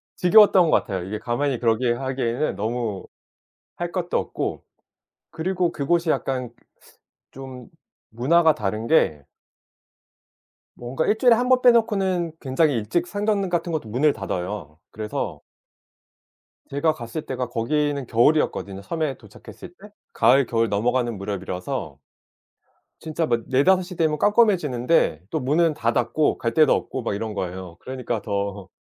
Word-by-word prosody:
지겨웠던 185 -2 +6
것 - - +1
같아요. 95 -3 0
이게 100 +4 -4
가만히 125 +2 -1
그렇게 120 +1 +2
하기에는 130 0 -2
너무 110 -1 -3 0.7
할 175 0 -4
것도 180 -1 -1
없고. - - -3 0.7
그리고 175 +2 -1
그곳이 165 +4 0
약간 130 -5 -1 0.8
좀 130 -2 -10 0.4
문화가 160 +8 +3
다른 110 +2 -3
게 75 - +2 1.5
뭔가 125 +6 -3
1 215 - +2
주일에 245 0 +5
1 250 +2 -1
번 255 -1 +4
빼 250 - +7
놓고는 195 -7 +1
굉장히 140 +3 +1
일찍 115 +10 -1
상점 205 +1 -1
같은 175 0 -1
것도 155 -9 -3
문을 140 +7 +2
닫아요. 90 -4 -5
그래서 105 -1 -4 1.3
제가 145 +3 +1
갔을 125 +2 -7
때가 125 -1 -3
거기는 140 +4 -1
겨울이었거든요 115 -6 +1
섬에 155 +4 -2
도착했을 105 - -13
때. 210 +2 -13 0.2
가을, 130 +4 +4
겨울 115 -1 0
넘어가는 120 +2 0
무렵이라서 95 -2 -5 1.1
진짜 160 +1 -1
막 120 -5 0
4-5 180 +9 +3
시 180 +1 -9
되면 155 -3 0
깜깜해지는데 165 - +2
또 160 - -1
문은 155 +5 +2
다 115 -5 0
닫고 150 +5 +1
갈 115 -1 -2
데도 155 -1 +5
없고 130 - -3
막 115 -4 -2
이런 110 +1 -4
거예요. 90 -2 -5
그러니까 125 -4 -4
더 100 -2 -3
130 Hz, 295 characters per minute, -23 LUFS, 115-165 Hz, 1.5 s, 빼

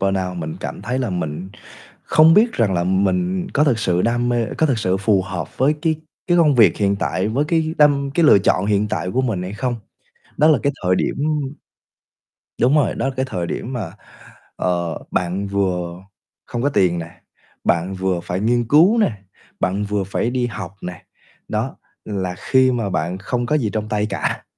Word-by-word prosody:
burnout, 95 -2 -1
mình 80 -2 -5
cảm - - -6
thấy 125 +4 -2
là 125 -6 -1
mình 90 +1 -4 0.5
không 160 +2 +5
biết 225 +3 +4
rằng 110 -6 +1
là 85 0 0
mình 180 - 0
có 145 +1 +4
thực 125 -7 +2
sự 90 -4 +1
đam 120 +1 +1
mê 120 -2 +1
có 160 - +4
thực 130 -5 0
sự 95 -3 +1
phù 100 -1 +2
hợp 95 -1 -6
với 140 +4 +3
cái 160 -1 +2 0.3
cái 175 - +3
công 150 -4 +5
việc 110 -8 +5
hiện 100 -1 +1
tại 95 +2 -1
với 135 +7 0
cái 160 0 0
đâm 140 -2 +4
cái 170 - +3
lựa 105 - +7
chọn 95 0 +1
hiện 105 0 +1
tại 90 -1 -2
của 130 - +1
mình 110 -8 -1
hay 95 +2 -5
không. 120 +2 -2 0.6
Đó 155 +2 +4
là 150 -5 +5
cái 140 - +1
thời 90 0 +3
điểm - - 0 1.5
đúng 130 +5 +4
rồi, 150 - +2
đó - - -2
là 135 - -4
cái 130 0 0
thời 90 -8 -3
điểm 120 - -4
mà, 95 -10 -4 0.6
ờ, 85 -2 -1
bạn 90 +3 -1
vừa 90 -3 -1 0.5
không 120 0 -4
có 145 - +3
tiền 90 -9 +2
nè, 85 0 -6 0.5
bạn 85 +3 +1
vừa 95 -2 -1
phải 90 +2 -3
nghiên 120 +1 +1
cứu 175 - +5
nè, 210 - +3 0.5
bạn 100 +3 0
vừa 100 -1 -1
phải 100 +5 -1
đi 125 -1 0
học 100 -5 -7
nè, 90 -1 -7 0.5
đó, - - -2 0.3
là 95 -3 -3
khi 130 -1 +3
mà 115 -5 -1
bạn 90 +1 -2
không 120 +5 -2
có 150 - 0
gì 110 -6 -1
trong 110 -1 -3
tay 105 -1 0
cả, 95 - -2
105 Hz, 205 wpm, -20 LUFS, 95-130 Hz, 1.5 s, lựa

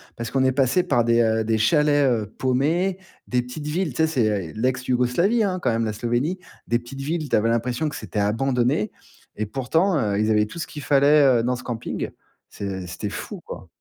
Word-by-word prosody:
Parce 115 0 -5
qu'on 135 -1 +1
est 130 - +3
passés, 135 +6 +2
par 120 -7 +2
des, 115 0 +3
heu, 110 -1 +2
des 110 0 +1
chalets, 145 +4 +3
heu, 115 -4 0
paumés, 160 +9 +1 0.3
des 125 0 +1
petites 125 +5 -8
villes. 165 +3 -1
Tu - - -18
sais, - - +4
c'est, 135 -8 +1 0.3
eh, - - -14
l'ex-Yougoslavie, 125 - +1
hein, 190 -3 0
quand 175 - +1
même, 115 0 0
la 110 - -2
Slovénie, 120 - -1 0.3
des 120 - +2
petites 120 +3 -9
villes. 155 +2 -2
Tu - - +2
avais 110 +2 +2
l'impression 120 +6 0
que 150 - -8
c'était 105 -1 -4
abandonné 120 +2 +1 0.4
et 105 0 -3
pourtant, 160 - +1
heu, 105 -6 0
ils 110 - +1
avaient 105 -1 +3
tout 110 +10 -9
ce 165 - -4
qu'il 150 - -8
fallait, 140 -2 +5
heu, - - 0
dans 125 +1 0
ce 120 - -9
camping. 120 -2 -4 0.4
C'est 95 -2 -5
c'était 90 - -5
fou, - - -7
quoi. - - -9
125 Hz, 215 wpm, -23 LUFS, 115-150 Hz, 0.4 s, fallait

